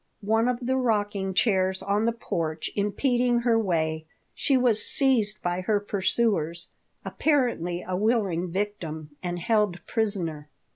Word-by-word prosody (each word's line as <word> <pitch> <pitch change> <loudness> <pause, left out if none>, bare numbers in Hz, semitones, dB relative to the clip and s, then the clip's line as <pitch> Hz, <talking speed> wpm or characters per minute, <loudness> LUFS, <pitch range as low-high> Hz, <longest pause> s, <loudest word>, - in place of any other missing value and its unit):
One 225 +2 +2
of 250 0 -1
the 260 +1 +1
rocking 205 -6 0
chairs 190 -4 +2
on 205 +2 +1
the 230 - +3
porch 165 -8 -3
impeding 240 +4 +1
her 235 -1 +3
way, 160 -5 -1 0.3
she 275 -2 +2
was 240 -4 +3
seized 235 -7 +2
by 175 +1 -1
her 205 +2 +1
pursuers, 195 -4 0 0.4
apparently 235 - 0
a 185 - -1
willing 195 -4 0
victim, 165 -6 -4
and 175 -1 -3
held 200 -2 0
prisoner. 175 -9 -2
205 Hz, 135 wpm, -26 LUFS, 175-230 Hz, 0.4 s, the